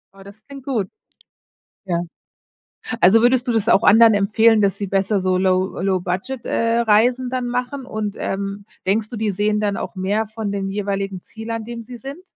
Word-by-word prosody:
Oh, 195 Hz, -, -15 dB
das 200 Hz, +2 st, -15 dB
klingt 275 Hz, -2 st, -11 dB
gut. 225 Hz, -9 st, -1 dB, 1.0 s
Ja. 175 Hz, -2 st, -1 dB, 1.0 s
Also 200 Hz, +6 st, +6 dB
würdest 250 Hz, +1 st, +3 dB
du 240 Hz, -, +1 dB
das 225 Hz, 0 st, 0 dB
auch 220 Hz, -, +5 dB
anderen 225 Hz, 0 st, +7 dB
empfehlen, 215 Hz, +2 st, +3 dB
dass 195 Hz, -1 st, +1 dB
sie 200 Hz, -, -3 dB
besser 195 Hz, +1 st, 0 dB
so 185 Hz, 0 st, +1 dB
Low 185 Hz, 0 st, +1 dB
Low-Budget, 190 Hz, +6 st, -2 dB
äh, 230 Hz, 0 st, +1 dB
Reisen 240 Hz, +3 st, +3 dB
dann 250 Hz, -1 st, -2 dB
machen? 250 Hz, +2 st, -3 dB
Und 215 Hz, -4 st, -4 dB
ähm, 200 Hz, +1 st, -4 dB, 0.2 s
denkst 210 Hz, +2 st, 0 dB
du, 235 Hz, -, -6 dB
die 215 Hz, -1 st, -1 dB
sehen 210 Hz, +2 st, 0 dB
dann 205 Hz, -1 st, 0 dB
auch -, -, -5 dB
mehr 205 Hz, +4 st, -1 dB
von 215 Hz, -1 st, -5 dB
den 195 Hz, -1 st, -3 dB
jeweiligen 195 Hz, -2 st, -3 dB
Ziel, 225 Hz, +1 st, -9 dB
an 225 Hz, -1 st, -3 dB
dem 235 Hz, -1 st, -6 dB
sie 240 Hz, +1 st, -10 dB
sind? 280 Hz, +9 st, -9 dB
215 Hz, 190 wpm, -20 LUFS, 195-230 Hz, 1.0 s, anderen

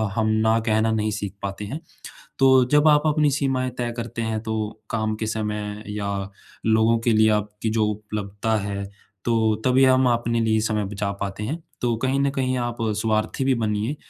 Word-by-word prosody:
हम 110 Hz, -1 st, +1 dB, 0.2 s
ना 110 Hz, +1 st, +4 dB
कहना 110 Hz, +1 st, +2 dB
नहीं 110 Hz, -1 st, 0 dB
सीख 100 Hz, -2 st, -4 dB
पाते 100 Hz, +1 st, -4 dB
हैं। 140 Hz, +10 st, -5 dB, 0.6 s
तो 130 Hz, -1 st, +6 dB
जब 150 Hz, +1 st, +6 dB
आप 150 Hz, -1 st, +5 dB
अपनी 150 Hz, -1 st, +3 dB
सीमाएँ 130 Hz, -2 st, 0 dB
तय 120 Hz, -1 st, -1 dB
करते 115 Hz, 0 st, -4 dB
हैं 110 Hz, -1 st, -1 dB
तो, 110 Hz, -1 st, -4 dB
काम 110 Hz, -1 st, -1 dB
के 110 Hz, -, -3 dB
समय 105 Hz, -1 st, -3 dB
या 105 Hz, -1 st, -3 dB, 0.6 s
लोगों 110 Hz, +1 st, +4 dB
के 115 Hz, 0 st, +2 dB
लिए 110 Hz, 0 st, +5 dB
आपकी 105 Hz, +1 st, -1 dB
जो 110 Hz, -1 st, +2 dB
उपलब्धता 105 Hz, +1 st, -3 dB
है, 100 Hz, 0 st, -3 dB, 0.4 s
तो 110 Hz, -2 st, +2 dB
तभी 130 Hz, +1 st, +5 dB
हम 130 Hz, -1 st, +4 dB
अपने 115 Hz, 0 st, 0 dB
लिए 110 Hz, -1 st, +2 dB
समय 105 Hz, -1 st, 0 dB
बचा 100 Hz, 0 st, -2 dB
पाते 100 Hz, +1 st, -4 dB
हैं। 155 Hz, +8 st, -4 dB, 0.2 s
तो 120 Hz, -2 st, +1 dB
कहीं 135 Hz, +1 st, +1 dB
न 140 Hz, -, +2 dB
कहीं 130 Hz, -2 st, -1 dB
आप 120 Hz, -1 st, -2 dB, 0.3 s
स्वार्थी 110 Hz, +3 st, 0 dB
भी 135 Hz, -, +3 dB
बनिए 110 Hz, +4 st, -1 dB
110 Hz, 185 wpm, -23 LUFS, 105-125 Hz, 0.6 s, तो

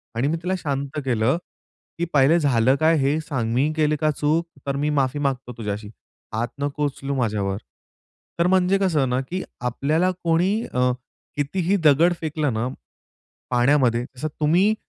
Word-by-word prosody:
आणि 120 Hz, +4 st, +1 dB
मी 160 Hz, +3 st, 0 dB
तिला 185 Hz, +1 st, 0 dB
शांत 140 Hz, 0 st, -3 dB
केलं, 120 Hz, +3 st, +2 dB, 0.6 s
की 170 Hz, -, 0 dB
पहिले 145 Hz, +4 st, +5 dB
झालं 130 Hz, -4 st, +3 dB
काय 160 Hz, +1 st, +4 dB
हे 140 Hz, +2 st, +1 dB
सांग. 125 Hz, -8 st, -2 dB
मी 140 Hz, +5 st, +2 dB
केली 155 Hz, -1 st, +2 dB
का 155 Hz, 0 st, +3 dB
चूक. 155 Hz, +3 st, 0 dB, 0.2 s
तर 140 Hz, -, 0 dB
मी 145 Hz, +2 st, 0 dB
माफी 140 Hz, -1 st, 0 dB
मागतो 135 Hz, -3 st, -2 dB
तुझ्याशी. 105 Hz, -1 st, -4 dB, 0.4 s
हात 115 Hz, +2 st, 0 dB
नको 145 Hz, +1 st, -1 dB
उचलू 140 Hz, 0 st, -3 dB
माझ्यावर. 105 Hz, -6 st, -1 dB, 0.8 s
तर 170 Hz, -, +4 dB
म्हणजे 185 Hz, +1 st, +3 dB
कसं 160 Hz, -9 st, +1 dB
ना, 125 Hz, +1 st, +1 dB
की 180 Hz, +8 st, -4 dB, 0.2 s
आपल्याला 150 Hz, +9 st, +1 dB
कोणी 170 Hz, +3 st, +2 dB, 0.2 s
अ, 125 Hz, 0 st, +2 dB, 0.4 s
कितीही 170 Hz, +6 st, 0 dB
दगड 160 Hz, +4 st, +5 dB
फेकलं 155 Hz, -4 st, -1 dB
ना 110 Hz, +2 st, -1 dB, 0.8 s
पाण्यामध्ये, 125 Hz, -1 st, +3 dB
जसं 135 Hz, +5 st, -3 dB
तुम्ही 175 Hz, +8 st, +4 dB
145 Hz, 155 wpm, -23 LUFS, 125-160 Hz, 0.8 s, पहिले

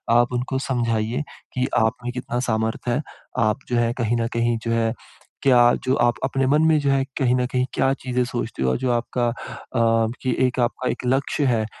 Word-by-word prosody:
आप 120 Hz, +1 st, +3 dB
उनको 125 Hz, +2 st, -1 dB
समझाइए 115 Hz, +1 st, 0 dB, 0.3 s
कि 130 Hz, 0 st, 0 dB
आप 110 Hz, 0 st, +3 dB
में 125 Hz, -, -1 dB
कितना 120 Hz, -1 st, -3 dB
सामर्थ 110 Hz, +2 st, -1 dB
है। 120 Hz, +4 st, +1 dB, 0.4 s
आप 110 Hz, 0 st, +2 dB
जो 125 Hz, -, 0 dB
है, 120 Hz, 0 st, +2 dB
कहीं 120 Hz, +1 st, +1 dB
न 115 Hz, -, 0 dB
कहीं 115 Hz, 0 st, +1 dB
जो 115 Hz, -, 0 dB
है, 115 Hz, -1 st, +1 dB, 0.5 s
क्या 120 Hz, -3 st, +6 dB
जो 130 Hz, +1 st, +2 dB
आप 120 Hz, -, +2 dB
अपने 135 Hz, 0 st, +1 dB
मन 150 Hz, +3 st, +4 dB
में, 155 Hz, -1 st, +4 dB
जो 145 Hz, -1 st, 0 dB
है, 135 Hz, 0 st, +2 dB, 0.2 s
कहीं 125 Hz, -2 st, +3 dB
न 125 Hz, -, +1 dB
कहीं 125 Hz, 0 st, 0 dB
क्या 135 Hz, 0 st, +2 dB
चीज़ें 125 Hz, -2 st, -1 dB
सोचते 120 Hz, -, -4 dB
हो 65 Hz, -, +2 dB
और -, -, 0 dB
जो 130 Hz, 0 st, 0 dB
आपका 120 Hz, 0 st, 0 dB
अ, 115 Hz, -1 st, -1 dB
कि 130 Hz, -2 st, 0 dB
एक 130 Hz, +1 st, -3 dB
आपका 125 Hz, +1 st, 0 dB
एक -, -, -6 dB
लक्ष्य 135 Hz, +3 st, +1 dB
है 115 Hz, -4 st, +2 dB
120 Hz, 215 wpm, -23 LUFS, 115-130 Hz, 0.5 s, क्या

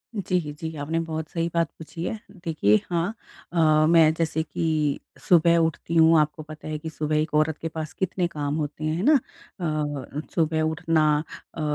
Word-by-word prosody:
जी, 185 Hz, -2 st, 0 dB, 0.2 s
जी 160 Hz, -1 st, -5 dB
आपने 155 Hz, +3 st, -2 dB
बहुत 160 Hz, -1 st, -4 dB
सही 165 Hz, -1 st, -1 dB
बात 170 Hz, -2 st, +1 dB
पूछी 165 Hz, +1 st, -7 dB
है। 220 Hz, +4 st, -3 dB, 0.3 s
देखिए 105 Hz, -10 st, +3 dB
हाँ, 175 Hz, +4 st, 0 dB, 0.4 s
अ, 155 Hz, -2 st, +4 dB
मैं 160 Hz, -2 st, +6 dB
जैसे 160 Hz, -1 st, -1 dB
कि 155 Hz, -3 st, -1 dB, 0.3 s
सुबह 170 Hz, -2 st, +5 dB
उठती 165 Hz, 0 st, -1 dB
हूँ 160 Hz, 0 st, +6 dB
आपको 150 Hz, +1 st, -1 dB
पता 155 Hz, 0 st, -10 dB
है 155 Hz, 0 st, -3 dB
कि 160 Hz, 0 st, -6 dB
सुबह 155 Hz, 0 st, -2 dB
एक 155 Hz, 0 st, -1 dB
औरत 155 Hz, 0 st, +2 dB
के 165 Hz, -, -2 dB
पास 155 Hz, -1 st, -6 dB
कितने 185 Hz, -1 st, -1 dB
काम 150 Hz, -3 st, -3 dB
होते 150 Hz, 0 st, -4 dB
हैं। 155 Hz, +1 st, 0 dB
है 185 Hz, -, -2 dB
ना? 305 Hz, -, +6 dB, 0.5 s
अ, 150 Hz, -3 st, -3 dB
सुबह 160 Hz, -1 st, +1 dB
उठना 160 Hz, 0 st, +1 dB, 0.5 s
अ, 160 Hz, -, -6 dB
160 Hz, 185 wpm, -25 LUFS, 155-165 Hz, 0.5 s, मैं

